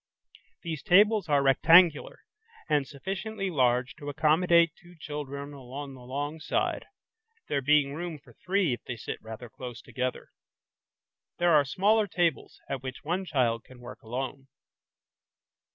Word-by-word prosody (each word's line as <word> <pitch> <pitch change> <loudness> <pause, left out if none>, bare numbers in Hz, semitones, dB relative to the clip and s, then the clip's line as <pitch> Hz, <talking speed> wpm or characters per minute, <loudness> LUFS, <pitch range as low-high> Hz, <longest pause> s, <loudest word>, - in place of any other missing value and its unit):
These 160 -4 -4
tables 205 -1 +4
are 140 -1 +3
rectangular 160 +4 +5 0.5
and 145 -3 +1
sufficiently 195 +6 -4
large 125 -3 +2
to 145 - -7
accommodate 165 +3 +4
two 175 0 -18
children 145 -1 -6
along 135 +1 -8
the 130 - -13
long 145 +5 -4
side, 155 - -1 0.6
there 140 - 0
being 145 0 +3
room 165 +1 -5
for 145 - -19
three 185 -6 0
if 120 - -6
they 125 - -4
sit - - -6
rather 110 +2 -9
close 120 0 -9
together. 130 -1 -4 1.1
There 175 -1 +3
are 150 -2 +6
smaller 205 +8 +2
tables 170 -6 -1
at 135 -2 -4
which 130 0 -7
one 180 +5 -2
child 120 -8 0
can 130 -1 -16
work 120 0 -11
alone. 130 +4 -5
145 Hz, 140 wpm, -28 LUFS, 130-175 Hz, 1.1 s, are